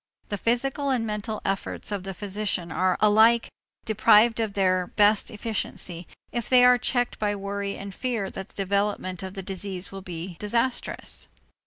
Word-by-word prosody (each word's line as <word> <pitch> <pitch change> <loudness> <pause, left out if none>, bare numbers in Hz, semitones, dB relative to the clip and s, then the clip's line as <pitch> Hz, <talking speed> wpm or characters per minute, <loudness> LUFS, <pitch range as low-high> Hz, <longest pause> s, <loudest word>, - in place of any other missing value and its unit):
The 205 - -2
physical 270 +6 0
and 250 -4 +1
mental 215 0 -4
efforts 195 +2 -3
of 200 -2 -2
the 195 0 -6
physician 200 -3 -2
are 185 +2 +1
alike 220 +2 +5 0.4
deprived 220 +1 +5
of 220 -3 -1
their 185 -2 +2
best 210 0 +3
efficiency 205 -6 -3 0.2
if 240 -2 -3
they 250 -1 +7
are 250 0 +6
checked 245 0 0
by 205 -1 0
worry 200 0 -4
and 195 0 -7
fear 230 -6 -2
that 195 +1 -7
the - - -21
developments 200 -2 -1
of 190 +1 -7
the 195 - -5
disease 190 0 -5
will 195 0 -7
be 175 -1 -7
disastrous. 235 +4 -2
205 Hz, 165 wpm, -26 LUFS, 190-225 Hz, 0.4 s, they